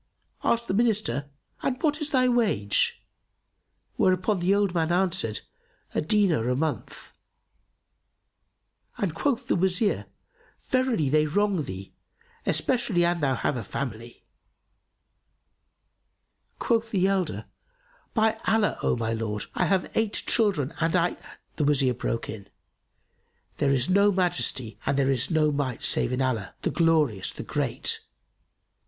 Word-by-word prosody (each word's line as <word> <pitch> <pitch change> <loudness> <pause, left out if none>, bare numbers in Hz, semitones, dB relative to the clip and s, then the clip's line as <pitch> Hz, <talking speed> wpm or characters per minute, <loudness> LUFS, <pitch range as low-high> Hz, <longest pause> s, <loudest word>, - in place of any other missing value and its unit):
Asked 235 0 +1
the - - -1
Minister, 200 - +1 0.3
"And 255 -1 -1
what 305 0 +1
is 300 - -1
thy 255 -3 +3
wage?" 210 - +1 0.9
whereto 185 +3 +3
the 185 +1 +2
old 200 -3 +1
man 165 -1 0
answered, 175 - 0 0.5
"A - - +1
dinar 160 - +2
a 125 - +1
month," 155 +2 -4 1.9
and 190 -6 -1
quoth 250 - -1
the - - +2
Wazir, 190 +3 +1 0.5
"Verily 255 - +1
they 155 +2 +3
wrong 200 +2 +1
thee, 95 -7 -7 0.5
especially 235 -9 +1
an 175 0 +1
thou 135 -4 +1
have 130 - -1
a 120 - -4
family." 120 +1 -6 2.3
Quoth 230 -1 0
the 190 -4 +1
elder, 195 -2 0 0.7
"By 220 0 +2
Allah, 220 -1 +2
O - - +1
my 115 -1 -1
lord, 110 -2 -3
I - - +1
have 190 -2 0
eight 220 -2 +1
children 190 - +1
and 165 +1 +1
I"— 175 0 +2 0.4
The 150 - +1
Wazir 140 -3 +3
broke 115 -1 -3
in, 100 -2 -8 1.1
"There 140 - +1
is 130 -1 +1
no 200 +2 +4
Majesty 130 - -1
and 140 0 0
there 135 -1 +2
is 130 0 +1
no 155 -2 +2
Might 140 -4 -2
save - - +1
in 130 +1 0
Allah, 115 -7 -2
the - - 0
Glorious, 155 - +2
the - - -8
Great! - - -1
170 Hz, 135 wpm, -26 LUFS, 130-205 Hz, 2.3 s, no